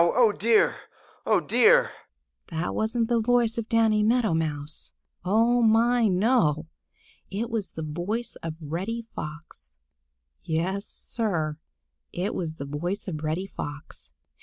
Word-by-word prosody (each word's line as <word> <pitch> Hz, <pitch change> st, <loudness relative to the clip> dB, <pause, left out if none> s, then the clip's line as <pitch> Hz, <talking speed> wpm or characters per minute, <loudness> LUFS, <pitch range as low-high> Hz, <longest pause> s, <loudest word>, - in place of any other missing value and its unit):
Oh, 225 Hz, +6 st, +4 dB
dear! 220 Hz, +2 st, +3 dB, 0.5 s
Oh, -, -, +4 dB
dear!" -, -, +4 dB, 0.6 s
That 165 Hz, +1 st, -3 dB
wasn't 225 Hz, +1 st, 0 dB
the 235 Hz, -1 st, +2 dB
voice 235 Hz, 0 st, +2 dB
of 225 Hz, -, -6 dB
Danny 225 Hz, -2 st, +3 dB
Meadow 220 Hz, -3 st, +2 dB
Mouse. 150 Hz, -2 st, -2 dB, 0.3 s
Oh, 230 Hz, +6 st, +3 dB
my, 230 Hz, +1 st, +4 dB
no! 180 Hz, -, +2 dB, 0.6 s
It 225 Hz, +5 st, -3 dB
was 220 Hz, -4 st, -3 dB
the 160 Hz, -, -5 dB
voice 175 Hz, +10 st, -3 dB
of 165 Hz, -1 st, -6 dB
Reddy 185 Hz, +10 st, -4 dB
Fox. 150 Hz, -, -8 dB, 0.7 s
Yes, 185 Hz, +5 st, -2 dB
Sir, 160 Hz, -9 st, 0 dB, 0.5 s
it 185 Hz, +5 st, -2 dB
was 160 Hz, -3 st, -4 dB
the 140 Hz, -, -6 dB
voice 175 Hz, +9 st, -4 dB
of 155 Hz, -4 st, -4 dB
Reddy 160 Hz, +5 st, -1 dB
Fox. 145 Hz, -, -8 dB
200 Hz, 130 wpm, -26 LUFS, 160-230 Hz, 0.7 s, Oh